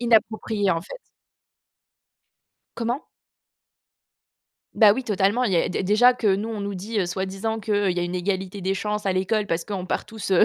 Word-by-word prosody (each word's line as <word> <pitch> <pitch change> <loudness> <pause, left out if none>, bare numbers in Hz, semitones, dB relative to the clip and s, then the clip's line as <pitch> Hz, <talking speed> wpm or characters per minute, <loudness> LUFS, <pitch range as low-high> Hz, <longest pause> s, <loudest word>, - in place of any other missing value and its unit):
inapproprié, 220 -4 +2
en 165 - -1
fait. - - -9 1.8
Comment? 235 +5 -2 1.7
Bah, 210 -3 +7
oui, 260 +3 -3
totalement 205 +4 +1
il 200 - 0
y - - +3
a, - - +2
dé 185 - -2
déjà 240 +6 +5
que 245 - -3
nous, 210 +3 -3
on 215 -2 -4
nous 200 0 -3
dit, 210 +4 -3
heu, 180 - +1
soi-disant 195 +4 -3
que: 205 -2 +1
«Il 180 - -2
y - - +1
a - - 0
une 175 +1 -3
égalité 190 +1 -2
des 190 +1 0
chances 210 +1 -3
à 190 - +2
l'école 200 +3 0
parce 165 -1 -1
qu'on 190 -2 -4
part - - -2
tous, 220 -3 -5
heu, 185 - +6
205 Hz, 195 wpm, -24 LUFS, 190-220 Hz, 1.8 s, Bah